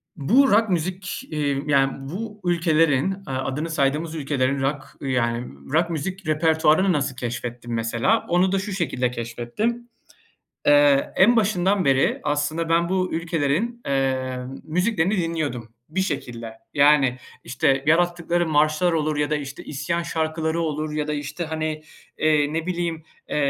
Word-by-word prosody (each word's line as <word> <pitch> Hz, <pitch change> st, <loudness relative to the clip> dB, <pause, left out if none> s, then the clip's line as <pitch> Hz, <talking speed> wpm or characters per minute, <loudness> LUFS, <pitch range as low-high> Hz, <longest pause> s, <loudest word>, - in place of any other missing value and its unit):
bu 235 Hz, -, +4 dB
rock 220 Hz, +1 st, +4 dB
müzik, 185 Hz, +3 st, -2 dB
eee, 145 Hz, -3 st, 0 dB
yani, 135 Hz, -1 st, +1 dB
bu 210 Hz, +2 st, -6 dB
ülkelerin, 165 Hz, -1 st, +2 dB
aaa, 130 Hz, -1 st, -3 dB
adını 150 Hz, +5 st, -3 dB
saydığımız 155 Hz, +2 st, 0 dB
ülkelerin 140 Hz, -2 st, 0 dB
rock, 135 Hz, 0 st, -3 dB
yani, 120 Hz, -3 st, -1 dB, 0.3 s
rock 170 Hz, +2 st, +3 dB
müzik 185 Hz, +3 st, -4 dB
repertuvarını 160 Hz, +3 st, +3 dB
nasıl 140 Hz, -3 st, -1 dB
keşfettim 120 Hz, -1 st, -5 dB
mesela? 115 Hz, -, +1 dB
Onu 180 Hz, +2 st, +3 dB
da 195 Hz, -, +1 dB
şu 200 Hz, +2 st, -5 dB
şekilde 130 Hz, -9 st, -1 dB
keşfettim, 125 Hz, -, -3 dB, 0.8 s
eee, 145 Hz, -1 st, +4 dB
en 235 Hz, +6 st, +5 dB
başından 195 Hz, -4 st, +2 dB
beri 135 Hz, 0 st, +2 dB
aslında 150 Hz, +3 st, -1 dB
ben 170 Hz, +1 st, +2 dB
bu 185 Hz, -1 st, 0 dB
ülkelerin, 165 Hz, +8 st, -1 dB
eee, 130 Hz, -2 st, 0 dB, 0.3 s
müziklerini 180 Hz, +3 st, 0 dB
dinliyordum 155 Hz, -9 st, -2 dB, 0.2 s
bir 180 Hz, +5 st, -1 dB
şekilde. 120 Hz, -9 st, -4 dB, 0.2 s
Yani, 140 Hz, -3 st, +4 dB, 0.3 s
işte, 135 Hz, +2 st, +1 dB
yarattıkları 175 Hz, +1 st, +2 dB
marşlar 155 Hz, +3 st, +2 dB
olur 155 Hz, -2 st, 0 dB
ya 145 Hz, 0 st, 0 dB
da, 150 Hz, -, +1 dB
işte, 140 Hz, -2 st, -6 dB
isyan 170 Hz, +4 st, -2 dB
şarkıları 160 Hz, 0 st, -1 dB
olur 155 Hz, -1 st, -2 dB
ya 150 Hz, 0 st, -2 dB
da, 150 Hz, -, -1 dB
işte, 145 Hz, +4 st, -4 dB
hani, 155 Hz, -1 st, -3 dB, 0.3 s
eee, 150 Hz, -1 st, +2 dB
ne 165 Hz, 0 st, -2 dB
bileyim, 170 Hz, -3 st, -2 dB, 0.3 s
eee, -, -, -3 dB
155 Hz, 145 wpm, -23 LUFS, 140-175 Hz, 0.8 s, en